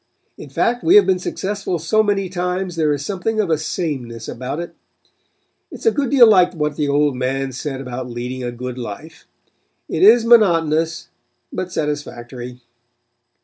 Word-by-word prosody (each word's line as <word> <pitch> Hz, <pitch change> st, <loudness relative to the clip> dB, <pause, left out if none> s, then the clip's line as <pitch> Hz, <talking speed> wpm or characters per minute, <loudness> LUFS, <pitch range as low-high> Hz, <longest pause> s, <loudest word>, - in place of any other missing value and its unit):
In -, -, -11 dB
fact 245 Hz, +1 st, 0 dB
we 355 Hz, -, +5 dB
have 415 Hz, -, +8 dB
been 185 Hz, -1 st, +2 dB
successful 195 Hz, 0 st, -3 dB
so 170 Hz, +7 st, +2 dB
many 200 Hz, -2 st, 0 dB
times 180 Hz, 0 st, -3 dB
there 155 Hz, -2 st, +1 dB
is 145 Hz, -1 st, -2 dB
something 215 Hz, +3 st, -2 dB
of 195 Hz, -6 st, +1 dB
a 160 Hz, -, +3 dB
sameness 130 Hz, -9 st, -4 dB
about 130 Hz, +5 st, -5 dB
it. 170 Hz, -, -6 dB, 1.0 s
It -, -, -10 dB
is -, -, -13 dB
a 450 Hz, -, +5 dB
good 280 Hz, -, -1 dB
deal 270 Hz, -4 st, +7 dB
like 185 Hz, -4 st, +4 dB
what 150 Hz, -2 st, -1 dB
the 150 Hz, -1 st, -1 dB
old 145 Hz, -1 st, +2 dB
man 135 Hz, +1 st, -2 dB
said 130 Hz, +2 st, -5 dB
about 125 Hz, -1 st, -6 dB
leading 125 Hz, +2 st, -5 dB
a 120 Hz, -, -3 dB
good 125 Hz, +1 st, -6 dB
life. 145 Hz, +8 st, -9 dB, 0.6 s
It 160 Hz, -, -3 dB
is 225 Hz, +4 st, +7 dB
monotonous, 165 Hz, -8 st, +3 dB, 0.4 s
but 185 Hz, 0 st, -4 dB
satisfactory. 125 Hz, -5 st, -5 dB
160 Hz, 170 wpm, -19 LUFS, 130-190 Hz, 1.0 s, have